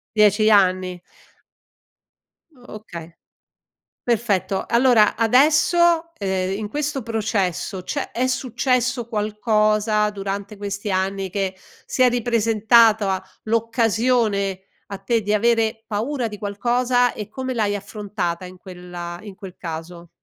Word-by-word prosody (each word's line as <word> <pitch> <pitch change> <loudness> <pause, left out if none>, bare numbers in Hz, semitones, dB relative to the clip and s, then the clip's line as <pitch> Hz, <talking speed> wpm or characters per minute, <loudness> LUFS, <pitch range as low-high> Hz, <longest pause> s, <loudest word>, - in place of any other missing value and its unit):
10 210 0 +4
anni. 185 -3 +3 1.6
Okay. 210 -9 -10 0.9
Perfetto. 210 -5 0
Allora 235 -3 +4
adesso, 320 +7 +3
ehm, 190 -1 -1
in 210 0 -4
questo 285 +2 -3
processo 205 -4 -2
c'è 285 +9 -4
è 255 +2 0
successo 250 -1 0
qualcosa 215 -1 +1
durante 200 0 -5
questi 200 +1 -5
anni 190 +1 -1
che 195 0 -2 0.3
si - - -2
è 255 - +7
ripresentata 225 -4 +3 0.2
l'occasione 225 -3 +1 0.2
a 200 - -6
te 225 +4 0
di 210 0 -1
avere 225 0 +1
paura 235 +4 -2
di 210 -1 -8
qualcosa 245 +4 +1
e 210 -1 -7
come 260 +3 -4
l'hai 210 -4 0
affrontata 200 -4 -4
in 180 0 -11
quella 180 -2 -8
in 205 -3 -10
quel 190 -3 -10
caso? 170 +1 -7
210 Hz, 115 wpm, -21 LUFS, 195-235 Hz, 1.6 s, è